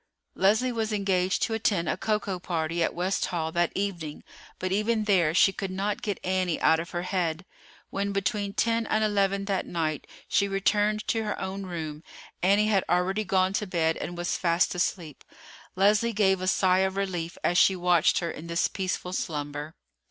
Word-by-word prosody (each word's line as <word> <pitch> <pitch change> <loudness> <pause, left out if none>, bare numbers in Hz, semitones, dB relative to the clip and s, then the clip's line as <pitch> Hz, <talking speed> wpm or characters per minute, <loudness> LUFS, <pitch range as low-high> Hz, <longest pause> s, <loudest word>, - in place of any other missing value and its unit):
Leslie 220 +6 +2
was 225 -2 -2
engaged 190 -3 +1
to 225 - 0
attend 200 -6 0
a - - +1
cocoa 210 -4 -1
party 170 -2 -2
at 165 - 0
West 185 +3 0
Hall 160 -3 -2
that 175 0 +1
evening; 175 -7 -3 0.3
but 185 - -3
even 215 +2 +1
there 185 -7 +3
she 185 +3 +4
could 195 -1 -4
not 195 +2 -2
get 205 -3 -3
Annie 185 -2 0
out 160 - +4
of 170 +2 -5
her 175 -1 -3
head. 180 -2 -2 0.5
When 200 +1 -1
between 200 0 -1
ten 230 +1 +1
and 215 - +1
eleven 200 -2 +1
that 195 -2 -1
night 155 -3 -2 0.2
she 200 - +2
returned 205 +2 +1
to 225 -1 +1
her 210 - -3
own 190 0 -4
room, 155 -4 -5 0.4
Annie 200 +3 +4
had 195 -3 +3
already 185 +4 +1
gone 190 -1 +1
to 210 +1 -1
bed 165 -3 +1
and 175 - -6
was 175 0 -1
fast 170 0 +2
asleep. 175 -4 -3 0.5
Leslie 210 +4 +3
gave 190 -3 +2
a 185 - -2
sigh 185 -1 +3
of 190 0 +1
relief 180 -4 -3
as 175 - +3
she 190 - +5
watched 175 -2 +3
her 170 -2 -1
in 160 +2 -9
this 170 0 +1
peaceful 185 -1 -3
slumber. 150 -2 -4
190 Hz, 185 wpm, -27 LUFS, 170-200 Hz, 0.5 s, she